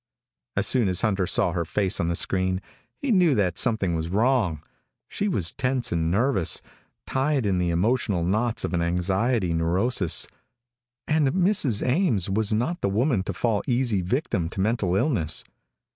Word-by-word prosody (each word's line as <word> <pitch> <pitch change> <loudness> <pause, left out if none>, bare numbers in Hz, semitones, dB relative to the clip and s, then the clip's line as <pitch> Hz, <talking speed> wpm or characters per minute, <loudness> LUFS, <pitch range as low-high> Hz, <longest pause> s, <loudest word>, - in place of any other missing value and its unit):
As 100 - +1
soon 120 -1 +2
as 90 - 0
Hunter 95 -5 0
saw 85 - +2
her 85 0 -1
face 95 +3 0
on 85 - 0
the 85 - -1
screen, 95 +1 0 0.4
he 280 - -2
knew 180 - +4
that 90 -6 +1
something 100 -6 +1
was 80 0 -3
wrong. 105 - +1 0.5
She 205 - -3
was 95 - 0
tense 130 -2 -1
and 80 -1 0
nervous, 100 -2 +2 0.4
tied 135 -2 0
in 95 -3 +1
the 90 -1 0
emotional 95 +1 0
knots 110 +6 0
of - - -5
an 85 - 0
anxiety 95 +3 0
neurosis. 90 +2 +1 0.8
And 155 -2 +2
Mrs. 180 - +1
Ames 125 - +1
was 110 +1 0
not 125 +11 -1
the - - 0
woman 115 +2 +1
to 100 - -3
fall 105 +2 0
easy 120 -6 +1
victim 95 - -1
to 95 - -8
mental 100 -3 0
illness. 100 - 0
100 Hz, 165 wpm, -25 LUFS, 90-125 Hz, 0.8 s, knew